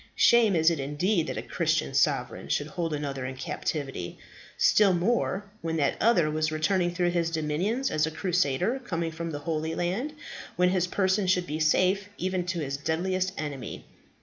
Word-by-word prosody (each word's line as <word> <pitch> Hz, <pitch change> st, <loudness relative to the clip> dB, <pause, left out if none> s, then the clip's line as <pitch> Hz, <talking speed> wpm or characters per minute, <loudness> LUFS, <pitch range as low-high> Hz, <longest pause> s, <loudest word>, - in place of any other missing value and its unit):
Shame 230 Hz, -5 st, +5 dB
is 160 Hz, +1 st, +4 dB
it 165 Hz, -, -2 dB
indeed 155 Hz, +6 st, 0 dB
that -, -, -4 dB
a -, -, -3 dB
Christian -, -, 0 dB
sovereign -, -, +1 dB
should 145 Hz, -, 0 dB
hold 165 Hz, +2 st, -3 dB
another 140 Hz, -3 st, -3 dB
in 130 Hz, -, -6 dB
captivity. 135 Hz, -, -4 dB, 0.4 s
Still 205 Hz, -3 st, +5 dB
more, 200 Hz, +1 st, 0 dB, 0.2 s
when 165 Hz, 0 st, -2 dB
that 140 Hz, -3 st, +1 dB
other 175 Hz, -10 st, +4 dB
was 155 Hz, 0 st, 0 dB
returning 175 Hz, +3 st, +1 dB
through 175 Hz, 0 st, 0 dB
his 170 Hz, -1 st, 0 dB
dominions 170 Hz, -, -1 dB
as 155 Hz, 0 st, +1 dB
a -, -, -1 dB
crusader 180 Hz, -, 0 dB
coming 165 Hz, -6 st, -2 dB
from 165 Hz, +1 st, -5 dB
the 150 Hz, -, -4 dB
Holy 160 Hz, +1 st, -2 dB
Land, 200 Hz, +13 st, -2 dB, 0.4 s
when 180 Hz, 0 st, +3 dB
his 180 Hz, -1 st, +1 dB
person 190 Hz, +1 st, +1 dB
should 180 Hz, -1 st, +2 dB
be 155 Hz, -1 st, -4 dB
safe, 185 Hz, +5 st, +2 dB
even 185 Hz, -1 st, -2 dB
to 175 Hz, -2 st, -2 dB
his 140 Hz, -1 st, -3 dB
deadliest 185 Hz, +5 st, -1 dB
enemy. 145 Hz, -5 st, -5 dB
170 Hz, 175 wpm, -27 LUFS, 155-185 Hz, 0.4 s, Shame